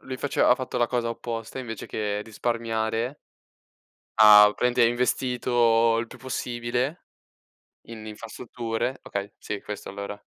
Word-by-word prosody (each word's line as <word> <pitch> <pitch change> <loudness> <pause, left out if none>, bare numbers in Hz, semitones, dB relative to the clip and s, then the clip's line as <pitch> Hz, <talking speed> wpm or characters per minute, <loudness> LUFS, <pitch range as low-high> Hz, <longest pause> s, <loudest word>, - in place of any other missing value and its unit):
lui 130 -1 -6
faceva 140 +2 +1
ha 125 - +8
fatto 130 -1 -4
la 120 - +3
cosa 120 -1 -1
opposta 115 +1 -5
invece 115 -5 -6
che 105 -1 -3
risparmiare, 115 +2 -2 0.9
ha 105 -1 +8
praticamente 125 0 +2
investito 120 -1 +2
il 115 - -2
più - - -13
possibile 125 +3 -3 0.8
in 110 -2 -9
infrastrutture. 115 +3 -4
Okay, 100 0 -5
sì 105 - -5
questo 105 -1 -7
allora. 100 +1 -7
115 Hz, 130 wpm, -25 LUFS, 110-125 Hz, 0.9 s, ha